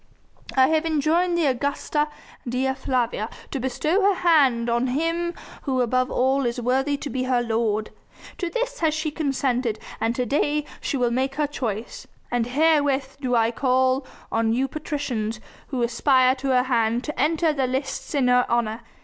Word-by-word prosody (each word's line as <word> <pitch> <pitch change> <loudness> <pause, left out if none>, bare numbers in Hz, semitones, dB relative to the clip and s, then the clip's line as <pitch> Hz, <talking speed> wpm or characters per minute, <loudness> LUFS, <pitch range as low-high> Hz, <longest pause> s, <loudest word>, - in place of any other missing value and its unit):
I 260 +1 +6
have 315 0 +2
enjoined 325 +3 +2
the 335 - +2
Augusta 285 +3 0 0.4
Dea 260 +2 0
Flavia 245 -5 -1 0.2
to 275 - -2
bestow 305 - 0
her 400 0 +4
hand 275 -10 +3
on 235 +2 +1
him 330 +6 -1 0.3
who 265 -3 -1
above 255 +1 +1
all 265 +2 +2
is 235 +1 -2
worthy 265 +4 +1
to 285 - -6
be 255 -1 -1
her 250 -2 +1
lord. 220 -2 -1 0.5
To 355 -3 -1
this - - -3
has 315 -2 +2
she 310 0 -2
consented 260 -6 -1 0.2
and 230 +1 0
to 250 -1 0
day 295 +4 +1
will 295 - -18
she 280 - -1
make 255 +2 0
her 300 +1 +1
choice, 235 -6 -5 0.2
and 240 -1 0
herewith 285 -1 +2
do 250 -2 0
I 230 0 +3
call 260 +1 +1 0.2
on 225 0 +1
you 260 +3 +1
patricians 265 -7 -3 0.3
who 255 -3 -2
aspire 255 +2 +3
to 270 +1 -5
her 255 -1 +3
hand 235 -2 +1
to 300 - -3
enter 320 +2 +2
the 270 -3 0
lists 270 +3 -3
in 270 -3 +2
her 250 0 +4
honour. 230 -1 0
260 Hz, 175 wpm, -24 LUFS, 245-295 Hz, 0.5 s, I